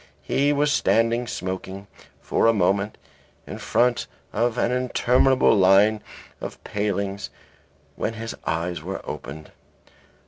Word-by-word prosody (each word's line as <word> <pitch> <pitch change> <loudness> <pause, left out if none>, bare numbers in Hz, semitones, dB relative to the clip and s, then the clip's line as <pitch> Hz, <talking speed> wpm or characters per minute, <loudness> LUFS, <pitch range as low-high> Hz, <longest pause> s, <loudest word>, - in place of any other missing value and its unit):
He 145 +1 +1
was 145 0 +2
standing 115 0 +2
smoking, 95 0 -5 0.4
for - - +1
a 115 - +5
moment, 100 +1 +1 0.5
in - - -8
the - - -7
front 120 0 +1 0.3
of 120 0 0
an 120 - +1
interminable 125 +1 +3
line 100 +3 +5 0.4
of - - -6
palings, 100 -1 -2 0.7
when 115 - -3
his 115 +1 -5
eyes 85 0 -2
were 95 +4 -6
opened. 75 +1 -7
105 Hz, 125 wpm, -24 LUFS, 95-120 Hz, 0.7 s, a